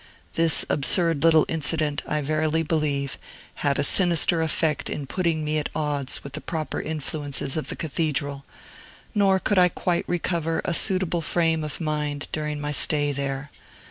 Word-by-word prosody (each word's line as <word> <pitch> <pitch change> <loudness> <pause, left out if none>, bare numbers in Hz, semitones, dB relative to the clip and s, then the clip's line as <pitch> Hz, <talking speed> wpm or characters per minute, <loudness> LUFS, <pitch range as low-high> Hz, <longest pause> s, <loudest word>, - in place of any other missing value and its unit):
This 165 -1 +3
absurd 165 +1 +2
little 160 -2 +5
incident, 155 -2 +1
I 150 - -1
verily 155 +2 0
believe, 145 -4 -1 0.4
had 140 -1 +1
a 145 - +1
sinister 170 +1 +4
effect 160 -1 0
in 145 - -4
putting 165 +1 -1
me 155 +1 0
at 150 - -3
odds 145 -3 -1
with 140 - -9
the 155 - -3
proper 160 -2 -4
influences 145 -3 -2
of 155 - -3
the - - -1
Cathedral, 145 -3 -2 0.7
nor 200 -3 +3
could 200 0 +1
I 180 0 +5
quite 175 0 -2
recover 170 -2 -1
a - - 0
suitable 185 -1 +2
frame 165 -1 +1
of 150 - -4
mind 150 -3 -3
during 150 -1 -3
my 145 0 -3
stay 145 0 +1
there. 140 0 -4
155 Hz, 160 wpm, -24 LUFS, 145-165 Hz, 0.7 s, little